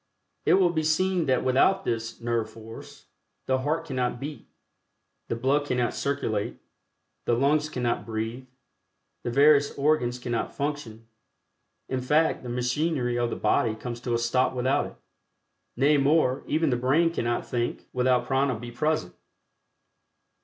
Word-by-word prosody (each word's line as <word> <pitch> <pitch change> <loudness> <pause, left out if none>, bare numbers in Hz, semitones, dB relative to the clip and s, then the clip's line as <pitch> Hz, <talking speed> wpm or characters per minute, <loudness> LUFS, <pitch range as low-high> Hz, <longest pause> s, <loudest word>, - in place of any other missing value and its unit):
It - - +6
will 185 -2 +4
be 160 -2 0
seen 170 +2 +1
that 130 -1 +2
without 190 +10 +3
this 115 -1 -3
"nerve 115 -2 -1
force" 115 0 -12 0.4
the 130 0 +1
heart 150 +5 -1
cannot 125 -3 -2
beat; 145 +2 -7 0.8
the - - -2
blood 140 +5 +1
cannot 125 -2 0
circulate; 115 -7 -2 0.7
the 120 - +2
lungs 145 +4 +2
cannot 125 -5 -1
breathe; 115 +3 -4 0.7
the - - -3
various 140 +3 +4
organs 140 -4 +1
cannot 120 -1 -3
function; 140 -6 -4 0.8
in 130 -1 -2
fact 150 +5 +2
the 125 - -7
machinery 125 0 0
of 120 -1 +1
the - - -3
body 110 -2 +1
comes 120 +1 -6
to 120 -1 -1
a - - +3
stop 125 +2 +1
without 130 +2 +1
it. - - -13 0.8
Nay 145 +3 +4
more, 140 -1 +3
even 155 -1 +1
the 125 - +1
brain 150 +7 +2
cannot 120 -5 -1
think 120 -1 -3
without 125 -1 +2
Prana 135 -1 +1
be 120 +2 -8
present. 150 - -1
130 Hz, 145 wpm, -26 LUFS, 120-150 Hz, 0.8 s, It